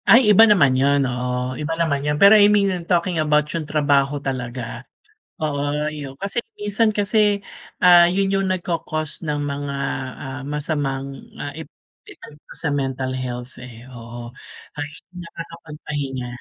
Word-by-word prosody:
Ay 230 - +9
iba 220 - +8
naman 140 -11 +5
yun. 140 +1 +3
Oo, 125 0 -2
iba 155 +2 -2
naman 155 -4 0
yun, 150 0 +1
pero 200 +1 +9
I 205 -1 +7
mean 205 -1 +3 0.2
talking 175 0 +1
about 150 -1 +3
yung 155 -3 -4
trabaho 145 -1 +2
talaga. 130 -3 -4 0.8
Oo 145 -2 -1 0.3
yun 140 -3 -8
kasi 200 - -2 0.2
minsan 210 +2 +1
kasi, 205 -1 +1 0.4
ah, 175 -1 +8
yun 195 +2 0
yung 195 0 +1
nagko-cause 165 -4 -3
ng 150 -3 -2
mga, 140 0 -4 0.5
ah, 135 0 -6
masamang, 140 -2 -3 0.2
ah, 145 0 -5
ep 160 +1 -9 0.4
epekto 150 0 -14
sa 155 - 0
mental 135 -2 -2
health, 125 0 -6
eh, 120 -2 -11
oo, 120 0 -9 0.5
ay 145 - -2 0.3
nakakapagpahinga. 150 -6 -6
150 Hz, 145 wpm, -21 LUFS, 135-175 Hz, 0.8 s, Ay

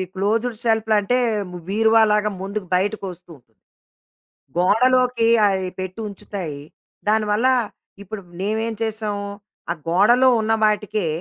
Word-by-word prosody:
Closed 220 +5 0
షెల్పులు 220 -1 +1
అంటే 245 +5 +1 0.5
బీరువాలగా 215 0 +3
ముందుకు 200 +1 -4
బయటకి 200 +3 -1
ఒస్తూ 180 0 -16
ఉంటుంది. 115 -5 -32 1.0
గోడలోకి 250 +4 +3 0.2
అయి 190 -2 0
పెట్టి 185 +3 -5
ఉంచుతాయి. 185 -7 -7 0.5
దానివల్ల 215 +2 +2 0.6
ఇప్పుడు 200 +1 -8 0.2
నేమేం 220 +3 -1
చేసాం? 215 -2 -2 0.5
ఆ - - 0
గోడలో 225 +9 +5
ఉన్న 220 0 0
వాటికే 210 -2 0
210 Hz, 105 wpm, -21 LUFS, 195-225 Hz, 1.0 s, గోడలో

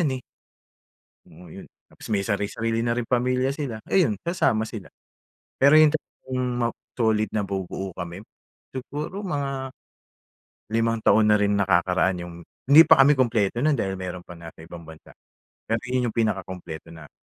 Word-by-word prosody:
yan, 160 - +2
eh. 130 - -9 1.1
Oo 85 +3 -15
yun, - - -11 0.2
tapos - - -15
may 100 -2 0
sari-sarili 110 +2 -1
na 120 +1 -1
rin 120 - -1
pamilya 125 +2 +1
sila, 140 -6 -4
ayun 155 - +2
sasama 165 -11 +1
sila. 110 -4 -9 0.7
Pero 140 +3 +7
'yung 155 -1 +6
talagang 130 -4 -5 0.2
ma 120 -1 +1 0.3
solid 110 -2 +1
na 105 -2 -1
bubuo 95 0 -5
kami 85 +1 -6 0.5
siguro 150 +8 -5
mga 140 -7 -3 1.0
limang 115 0 +1
taon 110 -1 +5
na - - +6
rin 100 0 +2
nakakaraan 95 -1 +1
yung 85 -1 -9 0.3
hindi 150 +4 +10
pa 160 -4 +6
kami 140 +2 +7
kumpleto 120 -3 +1
non, 155 - +4
dahil 95 -4 -2
meron 90 -1 -6
pa 90 - -11
nasa 85 -1 -12
ibang 85 0 -11
bansa, 80 0 -14 0.5
pero 115 0 -1
'yun 125 -1 0
'yung - - -17
pinakakumpleto 95 -7 -3
na 80 -1 -12
110 Hz, 160 wpm, -24 LUFS, 95-130 Hz, 1.1 s, hindi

